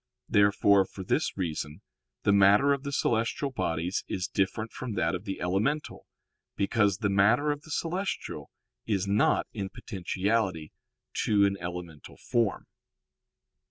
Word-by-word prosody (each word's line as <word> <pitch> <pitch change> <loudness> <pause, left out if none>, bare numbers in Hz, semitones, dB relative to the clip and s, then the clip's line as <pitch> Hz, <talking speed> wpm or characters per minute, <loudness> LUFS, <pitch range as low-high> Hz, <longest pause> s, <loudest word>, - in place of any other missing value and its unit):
Therefore 100 -1 +4
for 95 0 -9
this - - 0
reason 80 -5 -4 0.4
the 100 - +4
matter 100 +8 +5
of 140 - -2
the 140 0 -5
celestial 120 +2 0
bodies 85 -6 -2
is 90 - -2
different 110 +3 -1
from 125 -4 -5
that 85 -4 0
of 90 +3 -4
the 95 - -4
elemental, 105 +12 -1 0.5
because 100 -1 +2
the 105 0 0
matter 110 +9 +4
of 145 0 -4
the 160 - -16
celestial 180 +5 -3 0.4
is 100 -4 0
not 100 +2 +2
in 100 -3 -4
potentiality 95 -3 -2 0.5
to 100 -1 +4
an 100 0 +1
elemental 85 -3 -7
form. 115 -5 0
100 Hz, 135 wpm, -28 LUFS, 95-115 Hz, 0.5 s, matter